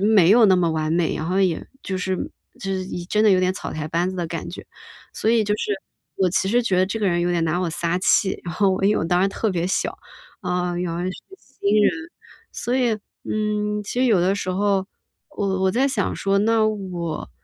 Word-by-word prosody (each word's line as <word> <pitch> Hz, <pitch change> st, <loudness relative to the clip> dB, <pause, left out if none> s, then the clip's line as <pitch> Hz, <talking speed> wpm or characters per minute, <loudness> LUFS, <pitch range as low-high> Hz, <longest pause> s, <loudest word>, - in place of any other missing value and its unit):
没 200 Hz, -4 st, +5 dB
有 230 Hz, +1 st, +7 dB
那 190 Hz, -2 st, +5 dB
么 170 Hz, -2 st, +2 dB
完 155 Hz, 0 st, -1 dB
美， 170 Hz, -1 st, +1 dB
然 155 Hz, -, -4 dB
后 185 Hz, +2 st, +1 dB
也 180 Hz, -4 st, 0 dB, 0.2 s
就 190 Hz, -, -3 dB
是 185 Hz, 0 st, -1 dB, 0.4 s
就 195 Hz, -, -4 dB
是 185 Hz, -1 st, -2 dB
一 175 Hz, -2 st, -6 dB
真 210 Hz, +2 st, +1 dB
的 210 Hz, -, +6 dB
有 185 Hz, -, +4 dB
点 185 Hz, 0 st, +2 dB
草 -, -, -6 dB
台 155 Hz, 0 st, -4 dB
班 170 Hz, +3 st, 0 dB
子 185 Hz, -, -7 dB
的 175 Hz, -, -2 dB
感 165 Hz, 0 st, -5 dB
觉。 175 Hz, -, -9 dB, 0.5 s
所 220 Hz, -, +1 dB
以 230 Hz, -2 st, +4 dB
就 210 Hz, 0 st, +1 dB
是， 210 Hz, -, -2 dB, 0.4 s
我 190 Hz, -, +2 dB
其 190 Hz, +1 st, +1 dB
实 240 Hz, +3 st, +3 dB
觉 195 Hz, -5 st, +1 dB
得 185 Hz, -, +4 dB
这 225 Hz, +3 st, -3 dB
个 205 Hz, -, +1 dB
人 175 Hz, -1 st, +1 dB
有 175 Hz, -, +1 dB
点 170 Hz, -1 st, +1 dB
拿 165 Hz, +2 st, 0 dB
我 180 Hz, -, 0 dB
撒 170 Hz, +2 st, -1 dB
气， 190 Hz, +1 st, +2 dB
然 170 Hz, -, -4 dB
后， 200 Hz, -2 st, +3 dB
因 195 Hz, -, +4 dB
为 -, -, +1 dB
我 -, -, -1 dB
当 180 Hz, +2 st, +2 dB
时 195 Hz, -, +3 dB
特 215 Hz, +2 st, -1 dB
别 175 Hz, -2 st, -1 dB
小， 185 Hz, -, -1 dB, 0.4 s
啊， 180 Hz, -1 st, -1 dB
原 175 Hz, -1 st, -2 dB
来 175 Hz, +1 st, -3 dB
是 185 Hz, -, -1 dB, 0.3 s
新 215 Hz, -, -2 dB
人。 -, -, +4 dB, 0.6 s
所 245 Hz, +2 st, -2 dB
以， 245 Hz, -3 st, +2 dB, 0.3 s
嗯， 210 Hz, -1 st, -1 dB
其 245 Hz, +4 st, -2 dB
实 -, -, +4 dB
有 210 Hz, -7 st, +4 dB
的 190 Hz, +3 st, +2 dB
时 195 Hz, -2 st, -3 dB
候， 195 Hz, 0 st, +1 dB, 0.4 s
我 190 Hz, -2 st, -1 dB
我 190 Hz, -, +3 dB
在 260 Hz, +7 st, +2 dB
想 240 Hz, -8 st, -1 dB
说， 195 Hz, 0 st, +1 dB
那 220 Hz, +1 st, +3 dB
我 180 Hz, -6 st, -4 dB
190 Hz, 260 characters per minute, -22 LUFS, 175-210 Hz, 0.6 s, 有